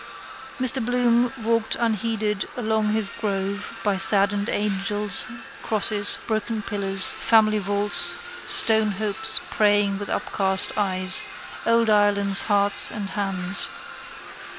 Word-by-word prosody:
Mr 255 Hz, 0 st, +1 dB
Bloom 245 Hz, 0 st, +1 dB
walked 230 Hz, 0 st, -1 dB
unheeded 220 Hz, -2 st, -2 dB
along 220 Hz, -2 st, -1 dB
his 215 Hz, -2 st, -1 dB
grove 200 Hz, -1 st, -4 dB
by 205 Hz, -3 st, 0 dB
saddened 200 Hz, +1 st, +5 dB
angels, 205 Hz, 0 st, -1 dB, 0.3 s
crosses, 210 Hz, -1 st, +1 dB
broken 220 Hz, 0 st, -3 dB
pillars, 195 Hz, -1 st, 0 dB
family 215 Hz, -2 st, +1 dB
vaults, 205 Hz, +1 st, +2 dB, 0.3 s
stone 220 Hz, -2 st, +4 dB
hopes 205 Hz, 0 st, 0 dB
praying 205 Hz, -2 st, +1 dB
with 205 Hz, -, -6 dB
upcast 190 Hz, -1 st, -1 dB
eyes, 190 Hz, -2 st, +3 dB, 0.5 s
old 230 Hz, 0 st, +2 dB
Ireland's 205 Hz, -2 st, +1 dB
hearts 200 Hz, 0 st, +1 dB
and 205 Hz, -3 st, -7 dB
hands. 195 Hz, -2 st, -2 dB
205 Hz, 105 wpm, -22 LUFS, 200-220 Hz, 0.5 s, saddened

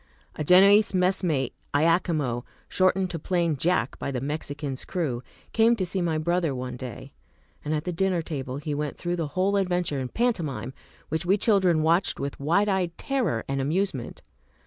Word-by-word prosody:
A -, -, -3 dB
Genoese 195 Hz, +5 st, +6 dB
messmate, 180 Hz, -7 st, +1 dB, 0.2 s
Iachimo, 155 Hz, -6 st, +1 dB, 0.2 s
shortened 185 Hz, 0 st, +2 dB
to 165 Hz, -, -4 dB
plain 170 Hz, -1 st, 0 dB
"Jack" 140 Hz, -4 st, 0 dB
by -, -, -3 dB
the 130 Hz, -2 st, -2 dB
"Mexican's" 145 Hz, -1 st, -4 dB
crew, 145 Hz, -10 st, -2 dB, 0.3 s
came 230 Hz, +1 st, +4 dB
to 190 Hz, -5 st, -1 dB
see 185 Hz, +1 st, -2 dB
my 165 Hz, -2 st, 0 dB
brother 170 Hz, -2 st, 0 dB
one 125 Hz, 0 st, -5 dB
day, 125 Hz, -1 st, -8 dB, 0.5 s
and 150 Hz, -, -3 dB
at 150 Hz, -, -2 dB
the 180 Hz, -, -3 dB
dinner 180 Hz, -1 st, 0 dB
table 135 Hz, -5 st, -4 dB
he 150 Hz, +1 st, -4 dB
went 145 Hz, 0 st, -3 dB
through 175 Hz, 0 st, -2 dB
the 165 Hz, -3 st, -1 dB
whole 195 Hz, +2 st, +2 dB
adventure 180 Hz, -6 st, 0 dB
in 130 Hz, -, -2 dB
pantomime, 150 Hz, -, -1 dB, 0.4 s
which 160 Hz, +2 st, -1 dB
we 190 Hz, +4 st, +3 dB
children 190 Hz, -7 st, +3 dB
watched 170 Hz, +4 st, +2 dB
with 140 Hz, 0 st, -4 dB
wide 170 Hz, +9 st, +2 dB
eyed 185 Hz, -4 st, 0 dB
terror 255 Hz, -, -1 dB
and 135 Hz, 0 st, -1 dB
amusement. 155 Hz, -2 st, -2 dB
165 Hz, 170 wpm, -26 LUFS, 140-185 Hz, 0.5 s, Genoese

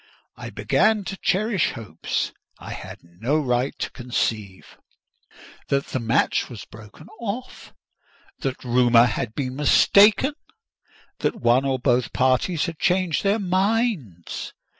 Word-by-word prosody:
I -, -, -8 dB
began 215 Hz, -1 st, +1 dB
to 195 Hz, -, -5 dB
cherish 200 Hz, 0 st, +1 dB
hopes 105 Hz, -, -3 dB, 0.3 s
I -, -, -9 dB
had -, -, -9 dB
no 105 Hz, -, -2 dB
right 125 Hz, -2 st, -1 dB
to -, -, -4 dB
conceive: 110 Hz, -6 st, -4 dB, 0.9 s
that 140 Hz, 0 st, 0 dB
the 130 Hz, -, -2 dB
match 115 Hz, +2 st, +1 dB
was 115 Hz, -6 st, -9 dB
broken 110 Hz, +7 st, -14 dB
off; 235 Hz, +3 st, -6 dB, 0.7 s
that 135 Hz, -1 st, -4 dB
rumour 120 Hz, -1 st, +5 dB
had 110 Hz, -1 st, -3 dB
been 130 Hz, -3 st, -3 dB
mistaken; 205 Hz, -, +5 dB, 0.9 s
that -, -, 0 dB
one 120 Hz, +3 st, +2 dB
or 135 Hz, -1 st, +1 dB
both 125 Hz, -1 st, +1 dB
parties 130 Hz, +7 st, +1 dB
had 165 Hz, -3 st, -6 dB
changed 180 Hz, -3 st, +1 dB
their 200 Hz, +2 st, +2 dB
minds. 190 Hz, -, -1 dB
135 Hz, 125 wpm, -23 LUFS, 120-190 Hz, 0.9 s, rumour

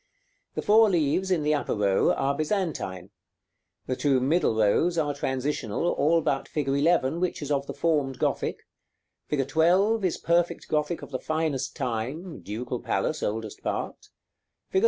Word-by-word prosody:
The -, -, -2 dB
four 220 Hz, +1 st, +6 dB
leaves 175 Hz, +1 st, +1 dB
in 175 Hz, -5 st, +1 dB
the 150 Hz, +1 st, +2 dB
upper 145 Hz, -, -1 dB
row 100 Hz, -2 st, +3 dB
are 140 Hz, +1 st, 0 dB
Byzantine; 150 Hz, -, -2 dB, 0.7 s
the 130 Hz, -, -2 dB
two 135 Hz, -1 st, +2 dB
middle 135 Hz, -2 st, +2 dB
rows 110 Hz, +11 st, +2 dB
are 150 Hz, -3 st, +1 dB
transitional, 135 Hz, -1 st, -2 dB
all 165 Hz, +3 st, +2 dB
but 135 Hz, -3 st, -1 dB
fig. 150 Hz, -3 st, -3 dB
11, 145 Hz, +1 st, +2 dB
which 180 Hz, 0 st, -1 dB
is 145 Hz, -, -4 dB
of 140 Hz, -1 st, 0 dB
the 140 Hz, -, -4 dB
formed 140 Hz, -3 st, 0 dB
Gothic; -, -, -1 dB, 0.6 s
fig. 135 Hz, -3 st, 0 dB
12 185 Hz, +9 st, +3 dB
is 185 Hz, -, 0 dB
perfect 170 Hz, 0 st, 0 dB
Gothic 150 Hz, +2 st, -1 dB
of -, -, -10 dB
the 130 Hz, -, -3 dB
finest 155 Hz, -4 st, -2 dB
time 130 Hz, +10 st, -4 dB
(Ducal 120 Hz, +4 st, -5 dB
Palace, -, -, -1 dB
oldest 110 Hz, 0 st, -3 dB
part), -, -, -4 dB, 0.6 s
fig. 380 Hz, -, +2 dB
150 Hz, 155 wpm, -26 LUFS, 130-170 Hz, 0.7 s, four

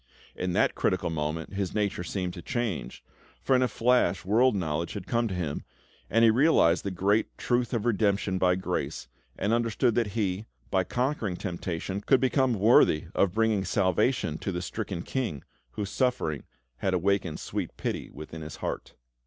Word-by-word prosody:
In 90 Hz, -1 st, -2 dB
that -, -, +3 dB
critical -, -, 0 dB
moment, 80 Hz, +2 st, -3 dB
his 100 Hz, -1 st, -2 dB
nature 100 Hz, -4 st, 0 dB
seemed 90 Hz, 0 st, -3 dB
to 85 Hz, -, -8 dB
change, 110 Hz, -, -3 dB, 0.4 s
for, 135 Hz, -, +2 dB
in 130 Hz, -, +3 dB
a 125 Hz, -, +3 dB
flash, 115 Hz, -8 st, +2 dB
world 115 Hz, +4 st, +4 dB
knowledge 85 Hz, -3 st, -2 dB
had 100 Hz, -4 st, -6 dB
come 120 Hz, -1 st, +1 dB
to 95 Hz, -, -3 dB
him, 80 Hz, -5 st, -3 dB, 0.5 s
and 115 Hz, +1 st, +3 dB
he 110 Hz, -, +7 dB
realised 115 Hz, -, +4 dB
the 100 Hz, -, -2 dB
great 100 Hz, +4 st, 0 dB
truth 120 Hz, -1 st, 0 dB
of 115 Hz, -3 st, -1 dB
redemption 100 Hz, -4 st, +1 dB
by 90 Hz, -1 st, +3 dB
grace, 95 Hz, -, -3 dB, 0.3 s
and 105 Hz, +3 st, 0 dB
understood 115 Hz, +1 st, +2 dB
that 115 Hz, 0 st, +1 dB
he, 100 Hz, -1 st, -1 dB, 0.2 s
by 95 Hz, -1 st, +3 dB
conquering 125 Hz, -3 st, -1 dB
temptation, 90 Hz, +1 st, -4 dB
could 130 Hz, +4 st, +4 dB
become 130 Hz, -1 st, +2 dB
worthy 95 Hz, -6 st, +4 dB
of 100 Hz, 0 st, +2 dB
bringing 110 Hz, -3 st, +2 dB
salvation 95 Hz, -, +1 dB
to 95 Hz, -, -3 dB
the 90 Hz, 0 st, -3 dB
stricken 95 Hz, -4 st, -4 dB
King, 110 Hz, -, -3 dB, 0.3 s
whose 100 Hz, -1 st, -4 dB
sufferings 125 Hz, -, 0 dB, 0.3 s
had 95 Hz, +7 st, 0 dB
awakened 95 Hz, -3 st, 0 dB
sweet -, -, -4 dB
pity -, -, -3 dB
within 75 Hz, +3 st, -9 dB
his 75 Hz, 0 st, -7 dB
heart. -, -, -5 dB
100 Hz, 170 wpm, -28 LUFS, 90-115 Hz, 0.5 s, he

